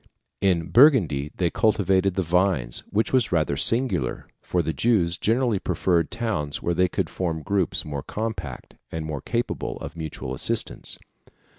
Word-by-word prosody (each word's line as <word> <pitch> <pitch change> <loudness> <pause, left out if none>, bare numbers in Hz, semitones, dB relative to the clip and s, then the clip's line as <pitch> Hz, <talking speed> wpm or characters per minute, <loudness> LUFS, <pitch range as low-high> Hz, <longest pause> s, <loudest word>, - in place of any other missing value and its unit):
In 90 -4 +1
Burgundy 90 - +5
they 85 -3 0
cultivated 95 -3 +2
the 95 - +1
vines, 85 -8 +1
which 110 +4 0
was 130 -4 +3
rather 75 -5 +1
singular, 100 - +1
for 90 -1 -1
the 80 - -2
Jews 90 - +2
generally 115 +1 +1
preferred 85 -3 +1
towns 100 -11 -2
where 85 - -1
they 90 +2 +3
could - - -2
form 80 -4 -3
groups 100 -1 0
more 70 -2 -4
compact, 105 - -5 0.2
and 80 -1 -4
more 75 -3 -4
capable 120 0 -3
of - - -8
mutual 75 -5 -5
assistance. 65 - -2
90 Hz, 150 wpm, -24 LUFS, 80-105 Hz, 0.2 s, Burgundy